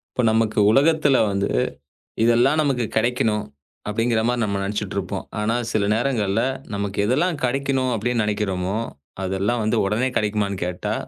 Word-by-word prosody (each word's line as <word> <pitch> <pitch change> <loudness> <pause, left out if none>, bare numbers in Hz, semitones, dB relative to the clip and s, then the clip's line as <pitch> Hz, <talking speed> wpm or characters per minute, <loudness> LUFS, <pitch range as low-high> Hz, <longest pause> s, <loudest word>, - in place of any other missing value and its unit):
இப்போ 125 - +1
நமக்கு 110 -1 +1
உலகத்துல 145 +2 +4
வந்து 100 0 0 0.8
இதெல்லாம் 120 +6 +4
நமக்குக் 130 -6 -1
கெடைக்கணும் 110 -2 +1 0.4
அப்படிங்கிற 115 +2 +1
மாரி 125 0 0
நம்ம 100 -2 -1
நினைச்சுட்டு 105 0 -3
இருப்போம். 95 0 -3
ஆனா 105 +2 0 0.2
சில 110 -2 +1
நேரங்கள்ல 110 -3 0 0.3
நமக்கு 100 0 -3
எதெல்லாம் 150 - +1
கெடைக்கணும் 130 0 0
அப்படினு 115 +1 0
நினைக்கிறமோ 100 -3 -1 0.5
அதெல்லாம் 95 +5 0
வந்து 110 - +1
உடனே 110 +6 +1
கெடைக்குமான்னு 105 -2 -1
கேட்டா 90 0 -3
110 Hz, 135 wpm, -22 LUFS, 100-125 Hz, 0.8 s, உலகத்துல